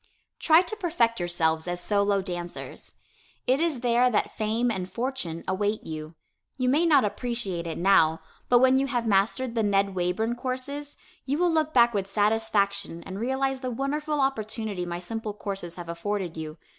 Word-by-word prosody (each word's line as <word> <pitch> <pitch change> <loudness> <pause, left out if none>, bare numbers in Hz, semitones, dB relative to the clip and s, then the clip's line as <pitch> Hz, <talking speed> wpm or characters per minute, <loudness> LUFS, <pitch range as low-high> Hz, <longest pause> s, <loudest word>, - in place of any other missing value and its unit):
Try 325 +2 +6
to 405 +5 -6
perfect 315 - +1
yourselves 165 -2 +1
as 175 0 -2
solo 200 +1 +1
dancers. 175 -2 -6 0.5
It 260 +2 +3
is 320 -7 0
there 245 0 +3
that 215 - 0
fame 225 +3 0
and 185 -3 -4
fortune 230 -8 -3
await 205 +3 -1
you. 155 0 -7 0.4
You 255 -1 +1
may 310 +6 +3
not 300 -9 +5
appreciate 205 -5 -3
it 165 - -4
now, 165 -4 +4 0.3
but 245 - +6
when 260 +1 +5
you 275 - 0
have 245 -4 -1
mastered 225 +4 +1
the 230 - +1
Ned 200 -1 +2
Wayburn 185 +6 0
courses, 275 +3 -4 0.3
you 280 +2 0
will 350 +1 +3
look 310 -1 +1
back 235 -4 +5
with 195 -2 -1
satisfaction 200 -3 0
and 190 +1 -6
realize 265 +2 -1
the 255 - -2
wonderful 295 +4 -2
opportunity 220 -7 -2
my 175 0 -3
simple 215 +4 -5
courses 195 -5 -5
have 175 -1 -8
afforded 175 +1 -3
you. 155 0 -6
220 Hz, 170 wpm, -26 LUFS, 185-255 Hz, 0.5 s, Try